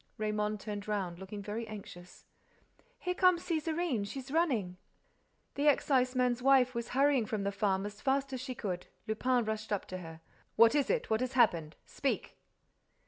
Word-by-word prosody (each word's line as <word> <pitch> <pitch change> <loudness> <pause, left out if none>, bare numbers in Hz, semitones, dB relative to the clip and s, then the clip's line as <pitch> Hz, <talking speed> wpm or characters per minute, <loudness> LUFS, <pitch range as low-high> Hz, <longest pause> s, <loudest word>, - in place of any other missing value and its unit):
Raymonde 210 -1 -1
turned 205 0 -6
round, 190 -5 -2
looking 200 +1 -7
very 220 +3 -4
anxious. 180 -4 -10 0.7
"Here 360 - -2
comes 365 -2 +4
Césarine. 315 - -1
She's 270 +3 -7
running." 245 - +1 0.8
The 285 +2 0
exciseman's 255 -3 +2
wife 260 -1 +5
was 235 -1 -4
hurrying 275 -5 +4
from 215 -2 -2
the 200 - 0
farm 195 -1 0
as 205 0 -8
fast 270 0 0
as 255 - -3
she 255 -1 -5
could. 185 -6 -4 0.2
Lupin 245 +2 +1
rushed 220 0 -4
up 205 - -1
to 185 - -5
her: 165 -2 -9 0.4
"What 230 +1 +7
is 290 -2 +2
it? 485 - 0
What 220 +2 +2
has 255 +1 -2
happened? 170 -11 +3
Speak!" - - -2
230 Hz, 165 wpm, -32 LUFS, 205-270 Hz, 0.8 s, What